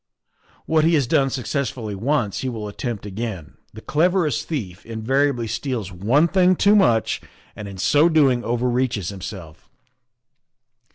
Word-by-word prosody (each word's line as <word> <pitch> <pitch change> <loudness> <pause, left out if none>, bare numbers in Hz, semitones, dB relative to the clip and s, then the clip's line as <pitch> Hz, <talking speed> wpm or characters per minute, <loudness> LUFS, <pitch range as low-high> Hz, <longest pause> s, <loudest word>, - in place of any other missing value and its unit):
" - - -34
What 160 -1 +2
he 165 +1 +4
has 140 -4 +2
done 135 +3 +2
successfully 125 -4 -3
once 115 0 -1
he 130 - -2
will 110 -3 -5
attempt 105 0 -5
again; 105 -5 -6
the - - -11
cleverest 165 -2 +1
thief 100 - -5
inva 110 0 -7 0.2
riably 120 -3 -4
steals 115 -5 -3
one 115 - +2
thing 185 +1 +3
too 205 +4 +4
much 120 - +2 0.3
and 105 - -7
in 100 -1 -9
so 145 - +4
doing 135 -7 +3
over 120 +2 -1
reaches 120 -7 -1
himelf." 90 -4 -8
120 Hz, 155 wpm, -22 LUFS, 105-145 Hz, 0.3 s, he